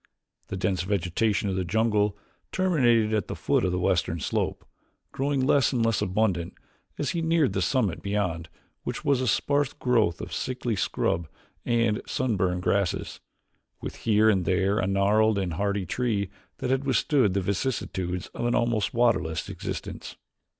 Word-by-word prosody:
The 95 - -4
dense 95 -1 0
vegetation 100 +3 0
of 95 - -1
the 95 - 0
jungle 105 +1 +1 0.3
terminated 120 -12 +3
at 105 -4 0
the - - -4
foot - - +1
of 90 - +1
the 90 - -1
western 90 -2 +1
slope, - - -2 0.5
growing 135 -1 0
less 140 -1 +3
and 120 -4 +1
less 115 -2 +1
abundant 95 -3 0 0.4
as 145 - -1
he 170 - -2
neared 160 -3 +2
the - - 0
summit 110 -11 0
beyond 90 -6 -2 0.3
which - - -5
was 140 -3 +3
a 130 - -1
sparse 145 +5 +1
growth 120 - +1
of - - -7
sickly 125 -3 -2
scrub 85 -3 -1 0.4
and 115 -3 +1
sunburned 95 -8 0
grasses, 100 -3 0 0.6
with - - -7
here 110 -1 +3
and 95 -5 +3
there 95 +3 +2
a 95 - 0
gnarled 105 +2 +3
and 95 -4 -1
hardy 100 +2 -1
tree 100 -2 -1 0.3
that 125 - -2
had 135 +1 +1
withstood 130 -4 +2
the 100 - +2
vicissitudes 95 -3 -2
of 120 - -2
an 120 - +1
almost 115 -4 0
waterless 115 -10 +1
existence. - - -6
105 Hz, 160 wpm, -26 LUFS, 95-125 Hz, 0.6 s, terminated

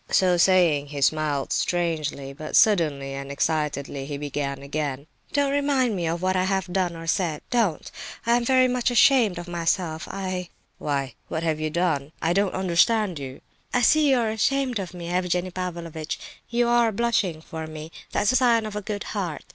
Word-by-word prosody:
So 185 -2 +4
saying 170 -5 +4
he 145 0 -6
smiled 150 -1 +1
strangely; 155 -6 -1
but 155 +2 -5
suddenly 150 - +3
and 140 0 -6
excitedly 140 -2 -1
he 145 -1 -4
began 140 -1 -4
again: 140 -1 -3 0.3
"Don't 285 -1 +1
remind 280 -5 +1
me 175 -3 -1
of 170 +2 -2
what 185 0 +1
I 185 0 +2
have 190 -2 -1
done 180 -3 0
or 165 0 -8
said. 165 -2 0
Don't! 225 -10 0 0.3
I 235 +1 +4
am 240 - +1
very 255 +1 +4
much 250 0 +1
ashamed 240 -5 +4
of 175 0 -6
myself, 170 -1 -1
I—" 185 -2 -4 0.3
"Why, 140 -2 -2
what 160 - -3
have 160 -2 0
you 155 0 -1
done? 155 -3 -1
I 165 +1 +1
don't 195 +1 +1
understand 190 0 +2
you." 130 -1 -8 0.3
"I 245 - +3
see 305 +4 +5
you 265 - +4
are 225 -2 +1
ashamed 255 +2 0
of 185 -2 -6
me, 170 -1 -7
Evgenie 180 0 0
Pavlovitch; 170 -3 -5 0.3
you 240 0 +1
are 240 -1 +3
blushing 210 -7 0
for 160 0 -7
me; 155 +1 -8 0.2
that's 205 - +2
a - - 0
sign 235 -3 +4
of 215 -1 -6
a 210 - -2
good 205 0 -4
heart. 185 -7 -3
175 Hz, 185 wpm, -25 LUFS, 155-215 Hz, 0.3 s, see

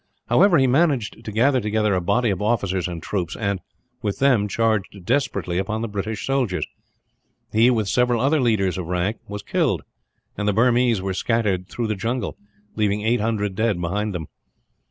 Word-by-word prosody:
However, 195 -4 +5
he 135 - +4
managed 130 -5 +1
to 110 - -6
gather 125 +4 +3
together 105 -1 +1
a 90 - +1
body 115 +6 +1
of 95 - -3
officers 100 -5 0
and 85 -2 -6
troops 90 -5 -2
and, 100 -3 -2 0.4
with 105 -4 -2
them, 130 -7 +3
charged 105 -4 -1
desperately 100 -9 0
upon 110 +3 -2
the - - -1
British 105 0 -4
soldiers. 130 -9 0 0.9
He, 115 +3 +5
with 110 -5 +1
several 125 +1 +2
other 140 +4 +2
leaders 100 -6 +1
of 85 - -5
rank, 90 +5 -1
was 105 0 -6
killed; - - 0 0.5
and 105 0 -2
the 105 - +3
Burmese 120 -2 +3
were 95 -1 -1
scattered 100 -3 0
through 120 - -3
the 110 - 0
jungle, 115 +1 -2 0.4
leaving 105 -1 0
eight 115 +1 +2
hundred 105 -3 -1
dead 110 -2 0
behind 100 +4 -2
them. 80 -3 -4
105 Hz, 175 wpm, -22 LUFS, 95-120 Hz, 0.9 s, However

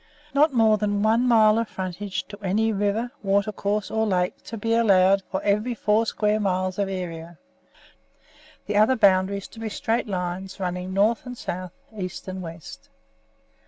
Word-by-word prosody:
"Not 295 +2 +4
more 220 -4 +3
than 205 -1 0
one 225 +3 +3
mile 220 -2 +5
of 230 - -1
frontage 185 +1 -5
to 205 0 -10
any 215 +3 +1
river, 205 +4 -1
watercourse, 200 +1 0
or 220 0 +1
lake 180 -2 0
to 230 - -6
be 225 +2 -1
allowed 195 -4 +4
to 190 - -1
every 210 +4 +1
four 215 +1 +1
square 210 0 +1
miles 185 -1 -1
of 200 -1 0
area; 170 -3 -6 1.3
the 205 - -1
other 215 +5 +5
boundaries 195 -2 +2
to 225 - -13
be 225 -1 -4
straight 230 +2 -1
lines 185 0 -4
running 180 0 -3
north 215 +6 +1
and 250 0 -7
south, 185 -3 -5 0.2
east 185 -2 -6
and 185 0 -5
west. 165 -2 -10
205 Hz, 160 wpm, -24 LUFS, 185-220 Hz, 1.3 s, mile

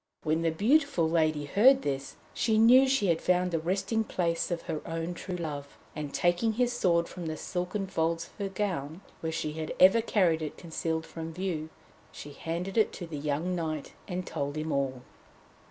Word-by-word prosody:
When 155 +1 +1
the 165 - +2
beautiful 220 - +3
lady 155 -2 +1
heard 255 - +5
this, 135 -1 -3 0.2
she 220 -2 +1
knew 250 +4 +7
she 265 -6 +2
had 170 -3 +2
found 180 0 +2
the 165 - 0
resting 195 +6 0
place 170 -5 -1
of 175 -2 -3
her 160 -3 -4
own 165 +1 -3
true 180 +1 -5
love, 145 -5 -5 0.2
and 150 -2 -4
taking 175 +8 +2
his 245 +2 +1
sword 170 -7 +2
from 175 -3 -7
the 155 0 -3
silken 180 +2 -3
folds 165 -2 -1
of - - -18
her 200 -1 -2
gown, 180 -5 -3 0.2
where 160 - -3
she 155 -1 -3
had 155 0 -4
ever 190 +5 +7
carried 180 -8 +2
it 155 - -5
concealed 160 -1 -3
from 165 0 -7
view, 170 -4 -3 0.4
she 145 - -9
handed 175 +8 -2
it 215 - +3
to 175 - -6
the 160 -3 -6
young 155 +5 -1
knight 155 -4 -3
and 180 -2 -3
told 145 -2 -3
him 155 +1 -2
all. 130 -2 -1
170 Hz, 190 wpm, -29 LUFS, 155-195 Hz, 0.4 s, knew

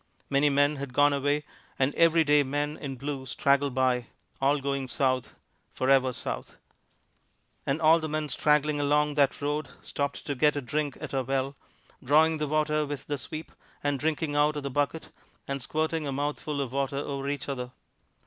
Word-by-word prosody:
Many 140 +1 +4
men 145 +1 +3
had 135 -2 -6
gone 145 0 +5
away; 145 +1 +1 0.3
and 135 +2 +2
every 165 -1 +5
day 150 -1 +5
men 145 +2 -1
in 140 -3 -6
blue 135 0 -5
straggled 140 +1 +1
by, 125 -2 +1 0.3
all 140 +2 +3
going 140 -1 -2
south, 130 -1 0 0.4
forever 130 0 +3
south. - - -5 1.1
And 140 +3 +1
all 160 +1 +6
the 155 -1 -4
men 155 0 -1
straggling 150 +1 +2
along 150 +1 +2
that 140 -2 +2
road 145 -1 -1
stopped 140 0 -3
to 145 - -1
get 150 +3 +3
a 145 - -1
drink 145 +2 -2
at - - -7
our 135 - +1
well, 135 +1 -1 0.5
drawing 155 +4 +4
the 150 - -1
water 155 0 +1
with 145 -2 -5
the 145 -1 -3
sweep, 155 +5 -7 0.3
and 145 -1 0
drinking 155 0 -1
out 150 +1 +3
of 145 - -4
the 140 - -3
bucket, 145 +4 -1 0.4
and 140 0 -3
squirting 155 +2 -1
a - - -2
mouthful 145 +1 -2
of 130 -3 -3
water 140 +1 -1
over 140 -1 -3
each 145 0 -3
other. 125 -3 -4
145 Hz, 180 wpm, -28 LUFS, 135-150 Hz, 1.1 s, all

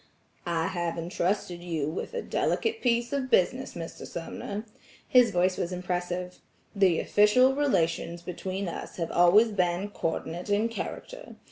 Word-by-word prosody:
"I 165 -1 0
have 175 -2 -2
intrusted 175 +1 -2
you 160 -5 -2
with 165 - -4
a 475 - -2
delicate 450 0 0
piece 240 0 +1
of 270 -2 -1
business, 255 +6 +2
Mr. 165 -1 -7
Sumner." 200 +5 -6 0.4
His 250 -2 +6
voice 180 +1 +1
was 175 - -2
impressive. 180 0 -3 0.4
"The 190 -4 +4
official 250 +6 +4
relations 170 - 0
between 185 +2 -4
us - - -6
have 165 -2 -3
always 180 +6 +6
been 185 0 0
coordinate 170 +1 -3
in 210 +3 +2
character. - - -7
185 Hz, 140 wpm, -28 LUFS, 175-230 Hz, 0.4 s, His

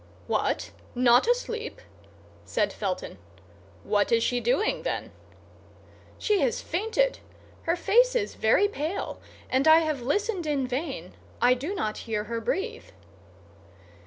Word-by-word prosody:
"What, - - -1 0.2
not 245 - +5
asleep!" 475 -1 -1 0.6
said - - 0
Felton; 185 - -4 0.6
"what 205 +1 +1
is 230 -1 +4
she 245 -1 +1
doing, 250 - +1
then?" - - -3 1.1
"She 420 -2 +1
has 475 -1 +1
fainted. 450 +7 0 0.5
Her 335 - +4
face 475 +8 +3
is 425 -4 0
very 225 - +3
pale, 340 -2 -4 0.3
and 265 +3 +1
I 320 +1 +8
have 310 -5 -1
listened 365 - -1
in 285 -3 0
vain; 255 - -4 0.3
I 245 +1 +5
do 290 +11 -4
not 215 - -2
hear 210 -1 0
her 230 +1 -4
breathe." 445 - -2
310 Hz, 130 wpm, -27 LUFS, -, 1.1 s, I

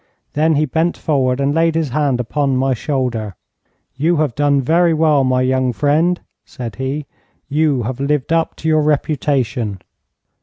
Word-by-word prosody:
Then 155 +1 +2
he 150 +2 +2
bent 160 +4 0
forward 135 -4 0
and 140 +1 +1
laid 165 0 +2
his 160 -3 0
hand 140 -1 0
upon 135 +2 0
my 135 +1 +1
shoulder. 120 - -2 0.6
'You 160 +6 +1
have 150 -5 0
done 145 +1 +2
very 165 +5 +2
well, 155 -3 +3
my 130 0 +1
young 130 -1 +1
friend,' 160 +7 +1 0.2
said 120 -6 -8
he. 135 +3 -3 0.4
'You 145 -4 +1
have 125 +3 -4
lived 145 +2 0
up 165 -1 0
to 160 - -5
your 155 -1 +3
reputation.' 135 -8 -1
145 Hz, 160 wpm, -18 LUFS, 130-155 Hz, 0.6 s, well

